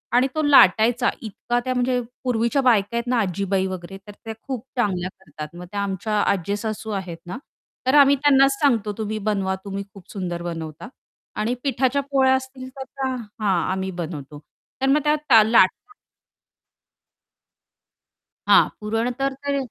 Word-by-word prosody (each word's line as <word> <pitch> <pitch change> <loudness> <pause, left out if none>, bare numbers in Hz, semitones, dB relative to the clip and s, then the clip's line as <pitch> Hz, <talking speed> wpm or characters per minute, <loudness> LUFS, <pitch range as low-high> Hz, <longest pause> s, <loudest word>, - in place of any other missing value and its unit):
आणि 255 +2 +4
तो 310 - +1
लाटायचा. 240 -2 +5
इतका 240 +2 -2
त्या 255 - 0
म्हणजे 250 0 +1 0.2
पूर्वीच्या 245 +2 +1
बायका 235 -3 +2
आहेत 235 - -1
ना 250 -1 +1
आजीबाई 195 0 -1
वगैरे, 185 +1 -7
तर - - -8
त्या 225 - -4
खूप 255 -4 -4
चांगल्या 185 -5 0
करतात. 155 -2 -10
मग 180 +1 -8
त्या 200 0 -2
आमच्या 200 +2 -2
आज्जेसासू 210 +3 -2
आहेत 170 -3 -8
ना, 180 +8 -6 0.5
तर 270 - +4
आम्ही 280 0 +6
त्यांनाच 275 -1 +4
सांगतो, 225 -7 +2
"तुम्ही 215 0 -3
बनवा, 190 -2 0
तुम्ही 200 0 -4
खूप 195 -3 -15
सुंदर 175 -3 -4
बनवता" 165 +2 -6 0.5
आणि 225 +3 -1
पिठाच्या 270 0 +1
पोळ्या 265 -1 +4
असतील 260 0 -6
तर 265 - -4
त्या 265 0 -4
हां. 210 -6 -2
आम्ही 190 0 -2
बनवतो. 150 -3 -7 0.4
तर 270 - +2
मग 295 +2 +4
त्या 295 -7 +5
लाट 220 -4 +5 2.8
हां. - - +6
पुरण 225 +3 -1
तर 275 0 0
ते 280 0 0
220 Hz, 150 wpm, -22 LUFS, 190-260 Hz, 2.8 s, आम्ही